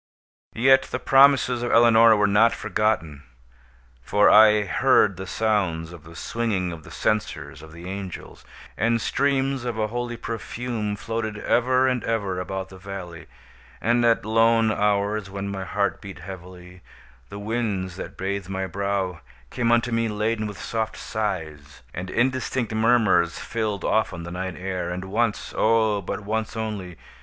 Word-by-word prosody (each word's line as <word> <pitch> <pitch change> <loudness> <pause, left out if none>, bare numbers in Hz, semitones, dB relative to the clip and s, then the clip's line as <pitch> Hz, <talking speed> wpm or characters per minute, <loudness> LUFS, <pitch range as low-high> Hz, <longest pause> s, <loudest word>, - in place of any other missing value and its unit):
Yet 130 +3 +4
the - - -2
promises 135 -1 +4
of 120 - -2
Eleonora 115 -1 +6
were 105 - +3
not 105 +3 +4
forgotten; 105 -9 -1 0.8
for 105 +11 +4
I 105 -1 +7
heard 100 +1 +3
the 95 +2 -7
sounds 90 -7 -1
of 80 -2 -13
the 85 +1 -13
swinging 100 -2 -2
of 80 -2 -9
the - - -13
censers 105 -6 -2
of 80 0 -13
the 85 +2 -10
angels; 95 -1 -7 0.3
and 115 +3 +1
streams 135 +1 0
of 120 -2 -3
a 110 -1 -1
holy 120 0 -4
perfume 115 -1 -4
floated 110 0 -4
ever 130 +4 +2
and 125 -2 0
ever 100 -5 -1
about 95 +1 -4
the 95 - -13
valley; 95 -3 -8 0.5
and 120 +1 +2
at 115 -2 +3
lone 115 0 +3
hours, 105 0 0
when 100 0 -5
my 95 -1 -4
heart 100 -1 -1
beat 100 -2 -9
heavily, 90 0 -11 0.5
the 100 - -8
winds 100 -4 -2
that - - -8
bathed 95 0 -3
my 95 0 -2
brow 100 -2 -2 0.3
came 120 -2 0
unto 120 +1 +2
me 115 0 +1
laden 110 +1 -1
with 105 -2 -8
soft 110 -1 -3
sighs; 80 - -5
and 90 +1 -5
indistinct 130 0 -1
murmurs 110 -7 +3
filled 110 -3 -3
often 95 -6 0
the 85 - -7
night 90 0 -4
air, 90 -2 -3
and 90 +1 -4
once—oh, 110 0 +1
but 95 - -5
once 110 +2 -3
only! 100 -6 -5
105 Hz, 155 wpm, -24 LUFS, 95-115 Hz, 0.8 s, I